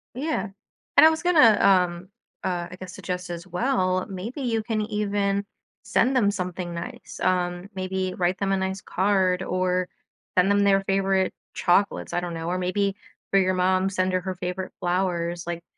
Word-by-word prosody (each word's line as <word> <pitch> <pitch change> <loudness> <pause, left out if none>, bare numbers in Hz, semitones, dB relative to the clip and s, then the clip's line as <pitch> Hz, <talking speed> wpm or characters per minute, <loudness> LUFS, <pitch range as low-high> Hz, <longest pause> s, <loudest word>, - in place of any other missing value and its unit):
Yeah, 255 -8 -2 0.5
and 315 - +9
I - - +9
was 320 +2 -2
gonna, 300 -12 +6
um, 180 -2 +3 0.3
uh, 175 -2 -2
I 180 - -9
guess, 185 0 -8
suggest 180 -1 -5
as 170 +1 -7
well, 185 -2 0
maybe 205 +9 -6
you 230 -4 0
can 215 -1 -2
even 205 -2 0 0.4
send 265 +1 +2
them 210 -6 +4
something 180 -3 -4
nice. 170 0 -7
Um, 180 0 0
maybe 185 0 -2
write 180 +1 0
them 195 -1 -1
a 195 - +2
nice 190 0 -2
card 190 -1 +1
or 185 -1 0 0.5
send 180 +2 +5
them 200 - +3
their 195 -1 +4
favorite 195 -1 +1 0.2
chocolates, 195 +3 +1
I - - +1
don't 175 -1 -4
know. 165 0 -4
Or 180 +1 0
maybe 195 +2 0 0.4
for 195 - +5
your 185 0 +2
mom, 185 +1 +2
send 185 -1 0
her 185 - +1
her 185 0 -4
favorite 180 +1 -4
flowers, 175 -1 -1
like, 170 0 -4
185 Hz, 180 wpm, -25 LUFS, 180-200 Hz, 0.5 s, and